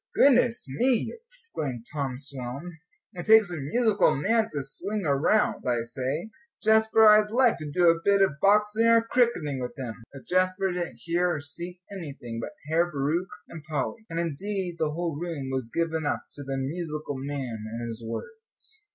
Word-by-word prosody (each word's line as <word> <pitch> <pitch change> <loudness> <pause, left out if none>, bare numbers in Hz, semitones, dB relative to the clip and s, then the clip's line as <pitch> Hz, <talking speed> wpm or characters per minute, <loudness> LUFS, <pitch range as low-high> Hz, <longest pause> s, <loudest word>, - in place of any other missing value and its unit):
"Goodness 250 -3 +4
me!" 240 - +1
exclaimed 305 - -5
Tom 135 -4 -2
Selwyn, 140 +5 -7 0.3
"it 175 -1 -7
takes 220 -4 +7
a - - -3
musical 215 - +2
man 220 +9 +1
to 145 -2 -3
sling 205 +9 -3
around. 145 +9 +2
I 120 -2 +1
say, 135 - -3 0.3
Jasper, 220 0 +5
I'd 210 0 +6
like 245 +1 +3
to 155 -1 -5
do 175 +4 +3
a 165 0 +4
bit 200 0 +4
of 150 -6 0
boxing 210 +3 +4
or 230 0 +5
cricketing 230 - +1
with 125 +5 -5
him." 125 -4 -4 0.2
But 135 - -12
Jasper 185 +1 +1
didn't 175 -1 -4
hear 175 +1 +1
or - - -3
see 175 +5 -8
anything 140 -11 -7
but 150 - -6
Herr 170 +3 +2
Bauricke 155 +6 -1 0.2
and 160 -3 -10
Polly; 155 - -3
and, 165 0 -3
indeed, 175 +2 -3
the 155 - +1
whole 165 -1 -3
room 160 -6 -4
was 130 -3 -3
given 165 -1 -1
up 145 - -1
to 145 - -9
the 135 -1 -3
"musical 150 0 -4
man" 130 -5 -4
and 120 +1 -4
his 115 0 -7
words. 440 - -8
165 Hz, 175 wpm, -27 LUFS, 140-210 Hz, 0.3 s, takes